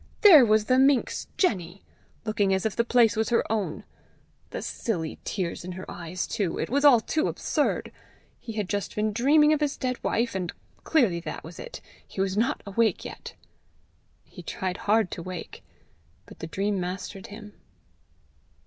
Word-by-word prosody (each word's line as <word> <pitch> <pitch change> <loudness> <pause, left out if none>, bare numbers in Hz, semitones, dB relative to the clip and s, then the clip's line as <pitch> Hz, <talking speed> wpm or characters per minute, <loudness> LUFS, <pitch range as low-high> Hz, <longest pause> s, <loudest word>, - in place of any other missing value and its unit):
there 345 - +9
was 215 -2 +3
the 255 +3 +3
minx, 270 -1 +2
Jenny! 190 - 0 0.4
looking 205 -3 +1
as 190 - -2
if 215 -3 -1
the 235 - +2
place 235 -2 +4
was 220 0 0
her 235 - +3
own! 210 -3 -2 0.7
The - - -5
silly 165 -9 -3
tears 180 -5 -3
in 180 +1 -6
her 185 +1 -7
eyes 175 +1 -4
too! 200 -7 -2
It - - -3
was 280 +2 +1
all 265 -6 +7
too 310 +7 0
absurd! - - -1 0.5
He 225 - -8
had 210 -3 -2
just 200 +1 -3
been 215 0 0
dreaming 300 +6 +5
of 305 - +1
his 295 -2 0
dead 255 -1 -3
wife, 235 +1 0
and 180 -2 -3 0.3
clearly 235 - +2
that 170 - -6
was - - -10
it! - - -8 0.3
he - - -9
was 190 0 0
not 235 +8 0
awake 210 0 +1
yet! - - -8 0.9
He - - -12
tried 185 0 -4
hard 215 -2 +2
to - - -5
wake, 180 -1 -8 0.6
but - - -15
the 165 - -5
dream 195 +3 -1
mastered 185 +2 -5
him. 210 0 -11
210 Hz, 175 wpm, -26 LUFS, 185-240 Hz, 0.9 s, there